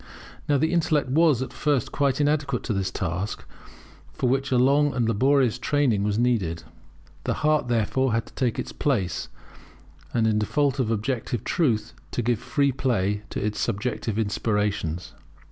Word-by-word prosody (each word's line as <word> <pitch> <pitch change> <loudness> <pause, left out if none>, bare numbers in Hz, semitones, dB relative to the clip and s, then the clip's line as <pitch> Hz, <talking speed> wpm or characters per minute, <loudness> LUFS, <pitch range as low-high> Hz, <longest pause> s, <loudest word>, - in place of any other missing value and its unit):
Now 145 - +4
the 160 +5 +1
intellect 155 -5 +1
was 150 -3 +3
at - - -8
first 145 -6 0
quite 140 -1 +1
inadequate 145 -3 +1
to - - -2
this 95 -1 -1
task, 95 +2 -3 0.7
for 125 - -1
which 135 +2 +1
a 125 - +3
long 140 +3 +3
and 120 -3 +1
laborious 130 +2 +2
training 140 -8 +1
was 105 0 0
needed. 100 -10 0 0.6
The - - 0
heart, 155 -4 +3
therefore, 120 +3 +1
had 115 0 0
to - - -17
take 125 -4 -1
its - - -4
place, 100 - -1 0.8
and 115 -2 +1
in 110 -1 +2
default 140 +5 +1
of 120 -4 +1
objective 115 +1 -2
truth, 120 -10 0 0.2
to 120 - -1
give 120 -1 +1
free 140 -1 +1
play 105 -6 0
to - - -3
its 105 -1 -2
subjective 110 0 -2
inspirations. 105 -5 -1
120 Hz, 160 wpm, -25 LUFS, 105-140 Hz, 0.8 s, Now